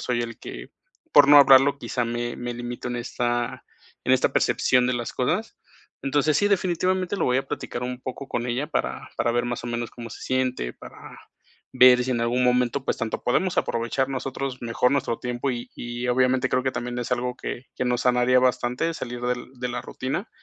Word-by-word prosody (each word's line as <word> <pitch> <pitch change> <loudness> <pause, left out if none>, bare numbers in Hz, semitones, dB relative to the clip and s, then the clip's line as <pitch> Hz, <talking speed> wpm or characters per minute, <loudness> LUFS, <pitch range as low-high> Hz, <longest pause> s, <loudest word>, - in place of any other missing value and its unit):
soy 120 -1 -1
el 115 0 -6
que, - - -9 0.4
por 140 -1 +7
no 145 - +9
hablarlo, 140 0 +7
quizá 125 -4 -2
me 120 0 -3
me 120 0 -4
limito 120 +1 -5
en 120 - -3
esta 120 0 -2 0.4
en - - +3
esta - - +3
percepción 125 -1 +3
de 125 - +1
las 120 -1 -4
cosas. 215 - -1 0.5
Entonces, 145 +2 +1
sí, 205 - +3
definitivamente 185 -1 +1
lo - - 0
voy 125 0 +2
a 135 - -4
platicar 120 - -4
un 125 0 -4
poco 130 +2 -6
con 120 +1 -2
ella 125 +5 -1
para 150 - -3
para 120 - +1
ver 120 0 +1
más 120 -1 -4
o 120 - -4
menos 120 -1 -3
cómo 115 -1 -9
se - - -10
siente, 130 - -1
para - - -13 0.8
ver 125 -1 +7
si 130 - -3
en 120 - -1
algún 120 +2 +1
momento, 125 +2 +1
pues, - - 0
tanto 115 -1 -3
podemos 175 +9 +1
aprovechar 120 +3 0
nosotros 135 -1 -4
mejor 120 +3 +1
nuestro 125 -4 0
tiempo 125 +2 -2
y 120 -1 -5
y 120 +1 -4
obviamente 130 +1 +2
creo 130 0 +1
que 130 - 0
también 120 0 -4
es 120 +1 -2
algo 125 0 -1
que 125 - -6
que 125 - -1
nos 125 -1 0
sanaría 125 0 +4
bastante, 125 +5 0
salir 120 -3 -6
del 125 +1 -3
de 125 - -2
la 120 0 -4
rutina, 135 - -4
125 Hz, 205 wpm, -24 LUFS, 120-130 Hz, 0.8 s, no